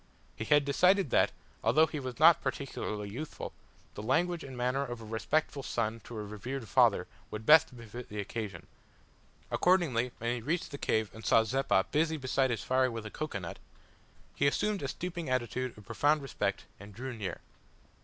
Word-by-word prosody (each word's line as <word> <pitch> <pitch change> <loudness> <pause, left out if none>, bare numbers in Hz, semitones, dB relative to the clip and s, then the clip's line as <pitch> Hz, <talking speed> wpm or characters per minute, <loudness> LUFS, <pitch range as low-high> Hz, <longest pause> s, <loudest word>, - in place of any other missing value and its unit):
He 110 - -4
had 145 +1 +4
decided 180 - +3
that, - - +4 0.3
although 155 +2 +5
he 155 -1 -5
was 130 -2 -5
not 160 +1 +7
particularly 130 -6 -3
youthful, 135 +10 -6 0.4
the - - -6
language 165 +9 +1
and 130 -2 -8
manner 125 +3 0
of 120 -3 -5
a 115 - -9
respectful 140 +6 -1
son 115 -3 -2
to 120 - -8
a 105 - -3
revered 110 +5 -5
father - - +4 0.2
would 110 +1 -6
best 150 -4 +6
befit 120 +1 -9
the 105 - -5
occasion. 105 0 -5 0.9
Accordingly 145 -10 +2
when 115 +1 -1
he - - -6
reached 160 +8 -2
the 140 - -6
cave 110 -1 0
and 110 - -11
saw 115 - +5
Zeppa 115 -5 +2
busy 160 +1 +2
beside 130 -1 +1
his 115 -3 -2
fire 130 0 +2
with 115 -2 -6
a 105 - -6
cocoa 155 -8 -4
nut, 85 -4 -7 0.8
he 140 - +3
assumed 205 +7 +1
a 140 - -2
stooping 170 +1 -4
attitude 130 0 -1
of 105 - -13
profound 145 +7 +2
respect, 100 -7 -2
and 100 0 -12
drew 130 +2 -5
near. 105 -4 -4
130 Hz, 185 wpm, -31 LUFS, 110-150 Hz, 0.9 s, not